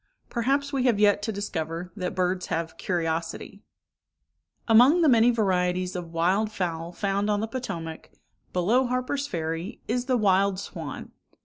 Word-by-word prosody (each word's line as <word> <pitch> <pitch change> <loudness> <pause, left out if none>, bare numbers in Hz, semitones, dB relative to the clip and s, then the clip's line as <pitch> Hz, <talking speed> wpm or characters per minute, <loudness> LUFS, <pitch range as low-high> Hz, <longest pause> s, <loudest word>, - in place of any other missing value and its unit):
Perhaps 275 +4 0
we 265 -2 +1
have 235 -5 +3
yet 205 -1 +4
to 220 +1 -2
discover 180 -4 -4
that 185 -2 -4
birds 180 0 0
have 165 0 -3
curiosity. 165 -2 -3 1.1
Among 250 +10 +6
the - - +5
many 235 -3 +6
varieties 185 -5 +1
of 175 -2 -5
wild 185 +6 +1
fowl 170 -4 -3
found 200 +3 -1
on 205 -1 +2
the 220 - -2
Potomac, 175 -10 -6 0.4
below 225 +9 +2
Harper's 255 +3 -1
Ferry, 165 - -4
is 245 +2 -1
the 255 -1 +2
wild 195 -2 +2
swan. - - -7
200 Hz, 145 wpm, -26 LUFS, 175-235 Hz, 1.1 s, Among